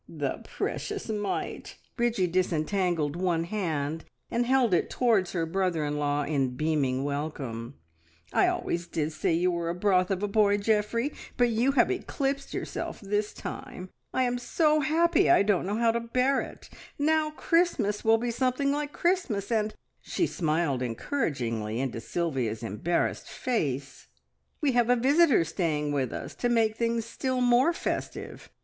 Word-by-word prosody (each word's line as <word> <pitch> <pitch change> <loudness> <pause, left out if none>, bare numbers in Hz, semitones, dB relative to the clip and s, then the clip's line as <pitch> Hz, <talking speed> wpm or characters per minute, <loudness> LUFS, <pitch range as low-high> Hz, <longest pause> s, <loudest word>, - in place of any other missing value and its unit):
"The - - -3
precious 410 - -4
mite!" 205 -2 -3 0.2
Bridgie 235 -6 +1
disentangled 175 -2 0
one 175 -2 0
hand 160 -5 -2 0.3
and 235 +1 +1
held 255 -5 +3
it 175 - +2
towards 220 -7 +2
her 165 -3 0
brother 175 -2 0
in 145 0 -2
law 145 0 0
in 135 -4 0
beaming 140 -3 0
welcome. 140 -4 -4 0.6
"I - - +4
always 170 0 -1
did 155 -1 -2
say 155 - 0
you 180 +2 +2
were 170 -1 -2
a 170 - -2
broth 185 -1 +2
of 195 0 -1
a - - +1
boy, 205 0 +3
Geoffrey, 220 +5 0 0.2
but 245 -1 +4
you 235 +4 +2
have 260 +4 +4
eclipsed 275 -7 -2
yourself - - -4
this 205 0 -1
time. 185 0 -7 0.2
I 260 - +1
am 245 0 0
so 305 +4 +2
happy 335 +6 +3
I 345 - +6
don't 195 -3 +1
know 205 +2 -1
how 230 0 +3
to 235 - -1
bear 255 +3 +1
it. - - -10 0.3
Now 310 +1 +2
Christmas 305 - +1
will 225 0 +5
be 240 +1 -2
something 260 +3 +1
like 290 0 -2
Christmas, 300 - 0
and 215 -1 +1 0.2
" - - -48
she 345 - -1
smiled 155 - 0
encouragingly 115 - -2
into 125 -3 -2
Sylvia's 125 -9 -2
embarrassed 115 - -1
face, 140 - -3 0.5
"we 290 -3 +3
have 240 -1 +2
a 245 - +6
visitor 275 - +4
staying 155 -3 -1
with 135 -4 0
us - - -6
to 245 - 0
make 225 -2 +2
things 230 -1 0
still 255 +2 -2
more 245 +5 +4
festive. 345 - -4
200 Hz, 160 wpm, -28 LUFS, 155-245 Hz, 0.6 s, I